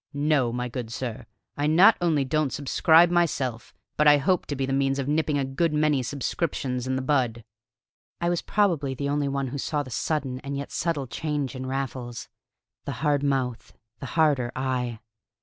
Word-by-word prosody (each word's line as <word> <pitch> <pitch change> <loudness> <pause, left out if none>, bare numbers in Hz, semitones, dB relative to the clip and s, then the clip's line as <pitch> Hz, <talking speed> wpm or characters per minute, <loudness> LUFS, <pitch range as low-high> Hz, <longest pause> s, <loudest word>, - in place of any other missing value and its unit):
No, 145 -4 +2
my 125 +1 -2
good 120 -2 -6
sir, 120 -1 -5 0.3
I 145 +1 0
not 180 +8 +7
only 155 -5 +2
don't 155 +1 +1
subscribe 160 +4 +4
myself, 140 -9 0 0.3
but 150 - +4
I 145 0 +8
hope 175 +6 +1
to 145 - -3
be 135 0 -1
the 135 - -2
means 135 0 +1
of 135 -1 -2
nipping 150 0 +1
a 140 - 0
good 150 +4 0
many 150 -3 +2
subscriptions 130 -1 -2
in 130 - 0
the 130 - -2
bud." 125 -5 0 0.8
I 170 - -1
was 175 -1 0
probably 165 -10 +1
the 140 +2 -2
only 145 0 0
one 140 -1 -2
who 140 - -5
saw 145 +2 -1
the 130 - -11
sudden 130 +2 -2
and 140 +1 -5
yet 140 - -6
subtle 160 -5 -1
change 140 +2 -3
in 130 0 -5
Raffles 130 -3 -4 0.6
the - - -3
hard 145 -1 +3
mouth, 135 -4 -1 0.3
the 135 - -6
harder 140 -6 +3
eye. 125 -3 -2
140 Hz, 185 wpm, -26 LUFS, 130-150 Hz, 0.8 s, I